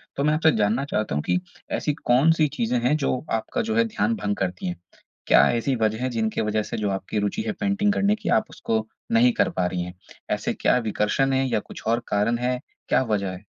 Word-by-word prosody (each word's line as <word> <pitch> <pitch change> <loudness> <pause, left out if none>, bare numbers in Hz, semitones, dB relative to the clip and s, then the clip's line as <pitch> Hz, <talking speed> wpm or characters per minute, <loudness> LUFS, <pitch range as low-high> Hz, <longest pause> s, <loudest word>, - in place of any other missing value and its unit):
तो 140 - -1
मैं 150 +1 +3
आपसे 160 +1 +4
जानना 110 +6 +1
चाहता 105 - -2
हूँ 75 - -1
कि 180 - +1 0.4
ऐसी 150 - -1
कौन-सी 155 +3 +3
चीज़ें 120 +1 +1
हैं 150 - +3
जो 140 -3 0
आपका 115 - -1
जो 225 -1 -2
है 230 0 +4
ध्यान 230 +1 0
भँग 105 - -2
करती 90 -1 -2
हैं? 90 -1 -4 0.5
क्या - - +6
ऐसी 120 +3 0
वजह 110 0 0
है 130 - 0
जिनके 110 -3 -1
वजह 105 0 0
से - - -5
जो 105 -2 -1
आपकी 95 +2 -2
रुचि 105 - -1
है - - +1
पेंटिंग 205 +1 +1
करने 205 +1 +2
की, - - -5
आप 110 - +3
उसको 110 -1 -2 0.2
नहीं 240 +2 +5
कर 220 - +2
पा 160 - -1
रही 90 0 -2
हैं? 90 0 -7 0.4
ऐसे - - -1
क्या - - +2
विकर्षण 135 +7 +1
हैं 135 0 +2
या 125 - +1
कुछ - - -11
और 115 +1 +1
कारण 105 +3 +1
हैं? 125 +1 -1 0.3
क्या - - +3
वजह 105 -5 -1
है? 90 +3 -10
120 Hz, 230 wpm, -24 LUFS, 105-155 Hz, 0.5 s, क्या